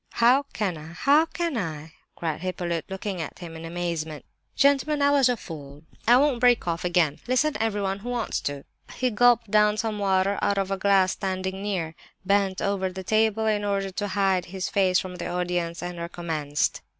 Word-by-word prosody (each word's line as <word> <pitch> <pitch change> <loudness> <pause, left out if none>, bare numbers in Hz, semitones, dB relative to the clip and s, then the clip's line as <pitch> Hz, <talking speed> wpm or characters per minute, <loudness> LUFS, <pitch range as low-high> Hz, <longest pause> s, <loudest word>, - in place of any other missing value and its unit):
"How 250 +4 +4
can 185 -7 -2
I? 160 +2 -10
How 290 - +4
can 340 -3 -2
I?" 160 -6 -4 0.2
cried 165 -2 -3
Hippolyte, 175 -3 -3
looking 190 -1 -4
at 155 - -6
him 170 -2 -9
in 160 0 -8
amazement. 165 -3 -4 0.3
"Gentlemen! 285 +2 +3
I 285 0 +4
was 275 -3 +4
a 245 - +1
fool! 150 -6 -10 0.2
I 240 +2 +7
won't 275 -2 +2
break 245 -5 +3
off 170 0 -1
again. 175 -4 +1
Listen, 290 +5 +2
everyone 205 -3 -1
who 235 +5 -7
wants 240 -2 -1
to!" 145 -1 -4 0.3
He 255 -1 0
gulped 235 -1 +3
down 210 0 +4
some 220 -1 -2
water 195 0 +1
out 200 -1 +1
of 195 0 -1
a - - +2
glass 190 -1 +3
standing 190 0 -3
near, 185 -6 -2 0.3
bent 195 -1 +1
over 195 -2 0
the 190 +1 -7
table, 220 +2 +2
in 210 -1 +1
order 195 -1 -1
to 205 +2 -3
hide 190 -2 +2
his 185 +1 -4
face 185 -2 +3
from 185 -1 -4
the 170 - -4
audience, 175 -1 -2
and 175 -1 -5
recommenced. 165 -4 -2
190 Hz, 190 wpm, -25 LUFS, 175-220 Hz, 0.3 s, I